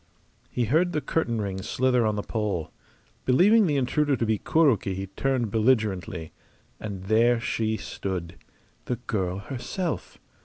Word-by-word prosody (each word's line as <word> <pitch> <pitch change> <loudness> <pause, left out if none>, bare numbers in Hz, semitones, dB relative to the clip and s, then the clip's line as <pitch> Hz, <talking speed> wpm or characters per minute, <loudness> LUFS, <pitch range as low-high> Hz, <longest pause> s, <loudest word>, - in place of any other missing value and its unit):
He 120 - 0
heard 170 - +2
the 150 - +1
curtain 120 -9 -1
rings 100 0 -4
slither 125 -3 +2
on 105 - 0
the 105 - -2
pole. 105 -7 -2 0.5
Believing 200 - +5
the 145 -3 +1
intruder 140 +2 +2
to 115 - -1
be 110 -2 +1
Kuroki 135 - +2
he 95 +1 -3
turned 120 +3 -1
belligerently. 105 -7 +1 0.5
And 100 -3 -6
there 115 +4 +3
she 110 -2 -1
stood 90 -6 -5 0.5
the 125 - -1
girl 95 -6 -2
herself! 140 - -4
115 Hz, 145 wpm, -26 LUFS, 100-130 Hz, 0.5 s, Believing